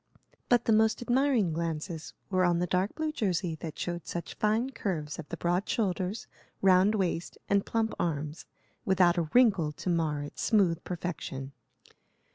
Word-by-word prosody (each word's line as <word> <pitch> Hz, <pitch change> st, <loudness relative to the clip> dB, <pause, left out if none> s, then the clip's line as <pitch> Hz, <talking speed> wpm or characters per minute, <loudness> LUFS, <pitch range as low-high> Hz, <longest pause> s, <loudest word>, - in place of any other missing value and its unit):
But 240 Hz, -1 st, +4 dB
the 225 Hz, -, +4 dB
most 220 Hz, +2 st, +3 dB
admiring 245 Hz, -, +2 dB
glances 165 Hz, 0 st, -4 dB, 0.2 s
were 185 Hz, -1 st, +3 dB
on 175 Hz, -1 st, +3 dB
the 175 Hz, -, +1 dB
dark 185 Hz, +3 st, 0 dB
blue 315 Hz, -1 st, -1 dB
jersey 185 Hz, -, -1 dB
that 160 Hz, -2 st, -6 dB
showed 175 Hz, -1 st, -4 dB
such 170 Hz, -, -5 dB
fine 220 Hz, +5 st, +1 dB
curves 165 Hz, -, -3 dB
of 155 Hz, -, -8 dB
the -, -, -5 dB
broad 175 Hz, +3 st, 0 dB
shoulders, 190 Hz, -1 st, -1 dB, 0.3 s
round 190 Hz, +2 st, +5 dB
waist, 175 Hz, -4 st, -2 dB
and 200 Hz, 0 st, +2 dB
plump 225 Hz, -1 st, 0 dB
arms, 155 Hz, -1 st, -3 dB, 0.4 s
without 180 Hz, -2 st, +3 dB
a 160 Hz, -2 st, -2 dB
wrinkle 200 Hz, -11 st, +4 dB
to 180 Hz, -, -3 dB
mar 155 Hz, -4 st, 0 dB
its 145 Hz, -, -7 dB
smooth 185 Hz, -7 st, +2 dB
perfection. 160 Hz, -6 st, -5 dB
180 Hz, 160 wpm, -29 LUFS, 165-215 Hz, 0.4 s, round